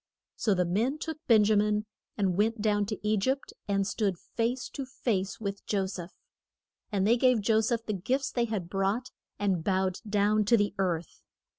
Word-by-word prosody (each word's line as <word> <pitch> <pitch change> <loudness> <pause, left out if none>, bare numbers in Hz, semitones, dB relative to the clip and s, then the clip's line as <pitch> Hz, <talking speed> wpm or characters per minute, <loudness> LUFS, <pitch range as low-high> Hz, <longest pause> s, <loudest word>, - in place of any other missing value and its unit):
So 210 -4 +1
the 180 -1 +2
men 225 - 0
took 320 -1 -5
Ben 220 -3 +6
ja 215 +1 +3
min 210 +1 +2 0.3
and 190 -3 +1
went 220 +3 +1
down 205 -1 +1
to 215 -1 -3
E 215 0 +3
gypt, 265 +7 -1
and 200 -1 +1
stood 200 -2 -1
face 240 +7 -2
to 275 - -5
face 215 -7 -2
with 200 -2 -4
Jo 195 -2 +1
seph. 185 -2 -7 0.7
And 195 -2 +1
they 235 +4 +4
gave 255 -1 +4
Jo 220 +1 +3
seph 230 0 -1
the 215 - -2
gifts 265 +8 -1
they 240 -1 +1
had 210 -6 -3
brought, 195 +7 -1 0.3
and 190 -5 0
bowed 190 0 0
down 210 +1 +3
to 235 +3 +5
the 205 -1 +1
earth. 175 -3 -2
210 Hz, 190 wpm, -29 LUFS, 195-230 Hz, 0.7 s, Ben